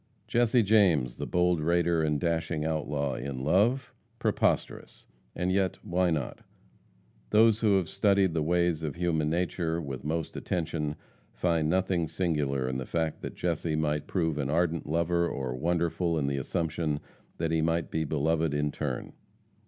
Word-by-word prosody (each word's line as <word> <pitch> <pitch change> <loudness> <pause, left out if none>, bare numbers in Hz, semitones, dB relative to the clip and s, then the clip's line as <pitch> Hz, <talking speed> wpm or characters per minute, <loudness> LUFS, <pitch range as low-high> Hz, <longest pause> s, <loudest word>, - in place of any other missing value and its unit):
Jesse 120 0 +3
James, 90 - +3
the - - -4
bold 90 -1 +2
raider 85 +1 +2
and 75 -2 +1
dashing 80 -2 -1
outlaw, 75 -3 -1
in 65 0 -5
love? 110 - +2 0.2
Preposterous! - - -1 0.3
And 90 +1 0
yet 95 -1 +1
why 90 -2 +1
not? 75 -6 -2 0.9
Those 110 0 +5
who 105 -4 +4
have 90 -3 -1
studied 100 -1 +2
the 80 - 0
ways 85 0 +1
of 80 -1 -3
human 85 -3 0
nature 85 0 -1
with 70 -5 -6
most 80 +2 -3
attention, 80 -3 -2 0.4
find 85 -3 +1
nothing 90 -2 +1
singular 75 -7 -1
in 65 0 -2
the 65 - -6
fact 80 -2 -2
that - - -6
Jesse 85 -2 -1
might 75 -1 -1
prove 80 -5 0
an 70 -1 -1
ardent 85 +1 0
lover, 85 +2 +1
or 65 -2 -3
wonderful 85 +3 0
in 75 - 0
the 70 0 -1
assumption 80 +2 -1 0.4
that 80 -1 -1
he 80 -1 +2
might 80 0 0
be 80 - 0
beloved 80 +1 0
in 75 0 0
turn. - - -4
80 Hz, 160 wpm, -29 LUFS, 75-90 Hz, 0.9 s, Those